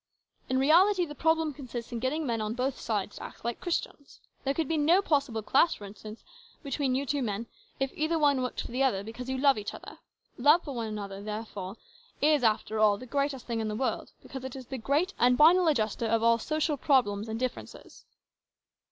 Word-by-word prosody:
In 260 Hz, -, +1 dB
reality 355 Hz, +7 st, +4 dB
the 295 Hz, -, -8 dB
problem 320 Hz, 0 st, +1 dB
consists 245 Hz, -4 st, -7 dB
in 235 Hz, -, -3 dB
getting 290 Hz, +6 st, -1 dB
men 230 Hz, -4 st, -1 dB
on 215 Hz, +1 st, -2 dB
both 260 Hz, +1 st, -2 dB
sides 210 Hz, -2 st, -3 dB
to -, -, -8 dB
act -, -, -11 dB
like 235 Hz, 0 st, -3 dB
Christians. 325 Hz, -4 st, -4 dB, 0.2 s
There 275 Hz, 0 st, 0 dB
could 325 Hz, -3 st, -1 dB
be 325 Hz, -, 0 dB
no 315 Hz, +5 st, +4 dB
possible 280 Hz, -, 0 dB
clash, 300 Hz, +9 st, +3 dB
for 205 Hz, -, -9 dB
instance, 215 Hz, +2 st, -10 dB, 0.4 s
between 275 Hz, -2 st, -1 dB
you 275 Hz, +2 st, -1 dB
two 285 Hz, +1 st, -1 dB
men, 220 Hz, -1 st, -2 dB, 0.3 s
if 270 Hz, 0 st, -1 dB
either 315 Hz, +2 st, 0 dB
one 285 Hz, -4 st, +3 dB
worked 250 Hz, -, -3 dB
for -, -, -8 dB
the 255 Hz, +2 st, -2 dB
other, 240 Hz, -8 st, +2 dB
because 230 Hz, +4 st, -7 dB
you 265 Hz, -, -1 dB
love 275 Hz, -3 st, +4 dB
each 210 Hz, +1 st, -6 dB
other. -, -, -11 dB, 0.4 s
Love 300 Hz, +7 st, +5 dB
for 285 Hz, -, -6 dB
one 230 Hz, -3 st, -3 dB
another, 200 Hz, -2 st, -6 dB
therefore, 210 Hz, -1 st, -6 dB, 0.4 s
is, 295 Hz, -2 st, +3 dB
after 220 Hz, -1 st, +1 dB
all, 210 Hz, -1 st, +4 dB
the 255 Hz, -, -10 dB
greatest 275 Hz, 0 st, -2 dB
thing 230 Hz, -2 st, -2 dB
in 220 Hz, -, -2 dB
the 210 Hz, -, -3 dB
world, 260 Hz, +4 st, -2 dB
because 265 Hz, -1 st, -8 dB
it 260 Hz, 0 st, -6 dB
is 260 Hz, -1 st, -8 dB
the 265 Hz, +1 st, -6 dB
great 290 Hz, -, 0 dB
and 250 Hz, +1 st, +4 dB
final 340 Hz, +4 st, +6 dB
adjuster 230 Hz, -5 st, +1 dB
of 225 Hz, 0 st, +1 dB
all 230 Hz, 0 st, +4 dB
social 310 Hz, +3 st, -1 dB
problems 230 Hz, -8 st, +2 dB
and 220 Hz, +1 st, -4 dB
differences." 255 Hz, -1 st, -6 dB
260 Hz, 215 wpm, -29 LUFS, 225-290 Hz, 0.4 s, final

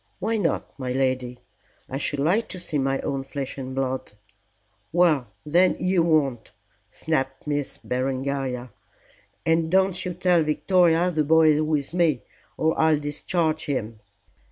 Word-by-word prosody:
"Why 220 Hz, +4 st, -1 dB
not, 190 Hz, -6 st, -1 dB
my 130 Hz, -1 st, -3 dB
lady? 130 Hz, -2 st, -1 dB, 0.5 s
I 135 Hz, -, -4 dB
should 145 Hz, -, -2 dB
like 185 Hz, +10 st, +1 dB
to 185 Hz, -, -7 dB
see 155 Hz, -4 st, -2 dB
my 135 Hz, 0 st, 0 dB
own 135 Hz, -1 st, -2 dB
flesh 135 Hz, 0 st, -6 dB
and 130 Hz, 0 st, -6 dB
blood." 130 Hz, -4 st, -2 dB, 0.8 s
"Well, 160 Hz, -7 st, +3 dB, 0.2 s
then, 175 Hz, +5 st, +3 dB
you 185 Hz, -1 st, +2 dB
won't," 145 Hz, -8 st, +1 dB, 0.4 s
snapped 135 Hz, -1 st, -2 dB
Miss 145 Hz, -2 st, -2 dB
Berengaria. 130 Hz, -1 st, -2 dB, 0.7 s
"And 165 Hz, 0 st, +2 dB
don't 190 Hz, 0 st, +2 dB
you 180 Hz, -1 st, -4 dB
tell 180 Hz, -1 st, +3 dB
Victoria 170 Hz, +2 st, +3 dB
the 155 Hz, -2 st, +1 dB
boy 160 Hz, +1 st, +5 dB
is 150 Hz, 0 st, +3 dB
with 155 Hz, -1 st, -1 dB
me, 165 Hz, -7 st, +2 dB, 0.3 s
or 160 Hz, 0 st, +1 dB
I'll 160 Hz, -1 st, +4 dB
discharge 155 Hz, +2 st, -1 dB
him." 115 Hz, -6 st, -3 dB
150 Hz, 145 wpm, -24 LUFS, 135-170 Hz, 0.8 s, boy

